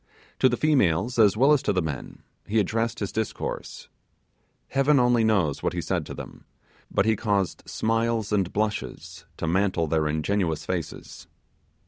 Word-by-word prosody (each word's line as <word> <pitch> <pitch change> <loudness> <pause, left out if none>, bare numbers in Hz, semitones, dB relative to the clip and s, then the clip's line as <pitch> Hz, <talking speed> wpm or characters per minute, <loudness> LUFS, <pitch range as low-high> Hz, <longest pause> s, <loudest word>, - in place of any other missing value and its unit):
To 130 - +5
the 125 - -1
females 120 - +2
as 105 -1 +5
well 135 +5 +5
as 145 - +3
to - - 0
the 95 - +1
men, 75 -4 -6 0.2
he 110 - 0
addressed 115 +3 0
his 100 - -2
discourse. 110 -1 -4 0.8
Heaven 140 +1 +3
only 125 -2 +3
knows 95 -10 +1
what - - -1
he - - -2
said - - -2
to - - -7
them, - - -10 0.4
but 100 - +1
he 110 0 +3
caused 100 -4 -1
smiles 115 -1 0
and 95 -4 +1
blushes 90 -5 -3
to - - -3
mantle 90 0 +1
their 80 0 +1
ingenuous 80 +1 -1
faces. 85 -4 -5
105 Hz, 160 wpm, -25 LUFS, 85-115 Hz, 0.8 s, To